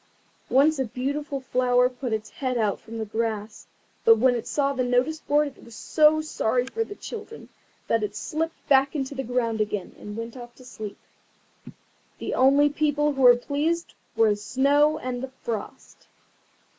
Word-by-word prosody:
Once 285 +3 +4
a 265 - +1
beautiful 275 +4 -3
flower 250 -1 +2
put 250 -1 -5
its 215 -1 -3
head 255 -2 -2
out 210 -4 0
from 225 0 -9
the 220 - -3
grass, 215 -1 -4 0.4
but 225 0 +7
when 250 +3 +4
it 235 - -4
saw 280 -1 0
the 260 -2 -1
notice 250 +6 +1
board 295 0 +1
it - - -18
was 230 -1 -13
so 310 +4 +3
sorry 250 -5 0
for 450 +12 -2
the 410 - -9
children 455 +1 -9 0.4
that 230 - +2
it 210 -1 -3
slipped 320 +8 -4
back 275 +1 +4
into 270 -1 -2
the 270 - -3
ground 230 -3 -1
again, 210 -3 -3
and 205 +1 -8
went 230 +1 -6
off 240 -1 -10
to 255 - -16
sleep. 215 -4 -8 1.2
The - - -4
only 275 +3 +5
people 295 0 +1
who 270 - -3
were 245 -1 +8
pleased 300 +6 -2 0.2
were 225 -1 +4
the 205 - 0
Snow 285 +8 +2
and 250 -3 -4
the 265 - -5
Frost. 225 -3 -6
255 Hz, 180 wpm, -25 LUFS, 230-290 Hz, 1.2 s, were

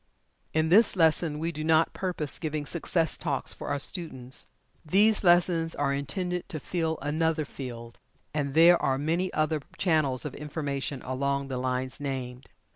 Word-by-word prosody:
In 160 0 +1
this 205 +5 +5
lesson 160 -2 +2
we 165 +2 -2
do 155 -1 -5
not 160 +1 +3
purpose 175 -7 -2
giving 155 -2 -3
"Success 165 +1 0
Talks" 145 -5 -2
for - - -8
our 145 - 0
students. 135 -5 -3 0.4
These 205 +7 +3
lessons 175 -2 +3
are 140 -1 0
intended 180 +6 -3
to 160 -5 -4
fill 160 0 -2
another 155 +1 0
field, 120 -4 -8 0.3
and 140 -2 -2
there 170 +2 +7
are 135 0 +1
many 165 +6 0
other 155 0 0 0.2
channels 150 - +2
of - - -4
information 140 -3 -4
along 140 +1 -1
the 130 -1 -3
lines 130 0 -2
named. 130 -2 -5
155 Hz, 155 wpm, -28 LUFS, 140-165 Hz, 0.4 s, there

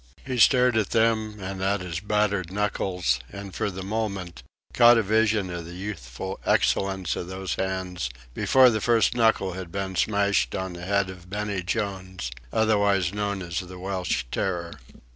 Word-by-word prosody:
He 130 -2 -2
stared 125 0 +5
at 110 -3 +1
them 110 -2 +1
and 95 0 -5
at 100 +1 +1
his 85 -2 -4
battered 100 -3 0
knuckles, 90 -9 0
and, 100 -1 -8
for - - -1
the 95 -1 -6
moment, 100 -4 -3 0.3
caught 120 -1 +7
a 115 - +3
vision 110 -2 +2
of 85 -1 -5
the 85 +1 -9
youthful 95 -3 -6
excellence 95 -2 +1
of 85 - -5
those 95 -2 -4
hands 95 -7 -3 0.2
before 130 - +5
the 110 -1 -1
first 115 -1 +3
knuckle 110 -5 +2
had 90 -2 -7
been 95 0 -3
smashed 100 +2 +1
on 95 -1 -3
the 85 0 -8
head 100 -1 +1
of 90 -1 -13
Benny 100 -1 -2
Jones, 95 - -3 0.2
otherwise 100 -4 +2
known 100 -2 -2
as 85 -1 -3
the 90 0 -8
Welsh 95 0 -2
Terror. 85 -3 -2
95 Hz, 165 wpm, -25 LUFS, 90-105 Hz, 0.3 s, caught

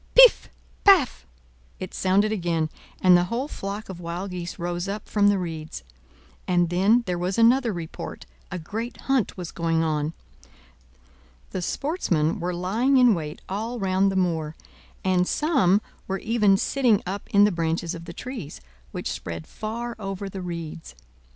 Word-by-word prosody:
"Piff - - +8 0.3
paff!" 345 - +5 0.5
it 185 - -6
sounded 200 +3 +2
again, 170 -6 -1 0.3
and 180 -1 +8
the 175 0 +4
whole 235 +8 -2
flock 205 -5 -5
of 190 -2 -8
wild 175 +3 -5
geese 175 -1 -5
rose 175 +1 -3
up 205 +2 -5
from 205 -1 +3
the 205 -1 +4
reeds. 160 - -5 0.6
And 175 -1 +2
then 205 +7 +4
there 180 -2 -2
was 180 +2 -1
another 235 +1 +4
report. 170 -4 -7 0.2
A 180 - -4
great 220 +8 -5
hunt 270 -7 0
was 175 -2 -6
going 165 -1 0
on. 155 0 -1 1.4
The 185 - -3
sportsmen 175 - 0
were 180 +1 -2
lying 215 +10 +1
in 250 -3 +6
wait 155 -4 -5
all 220 +5 -3
round 195 -1 +2
the - - -4
moor, 165 -4 0 0.5
and 180 -1 +2
some 255 - +3 0.3
were 195 - -1
even 210 -2 +3
sitting 245 -3 +2
up 195 +2 -5
in 200 0 +5
the 205 - +5
branches 165 0 -1
of 170 -1 -8
the 170 - -8
trees, 235 - -7 0.3
which - - -4
spread 85 -2 -6
far 235 +2 -5
over 195 -1 -4
the 195 0 -6
reeds. 165 - -6
185 Hz, 160 wpm, -25 LUFS, 170-220 Hz, 1.4 s, Piff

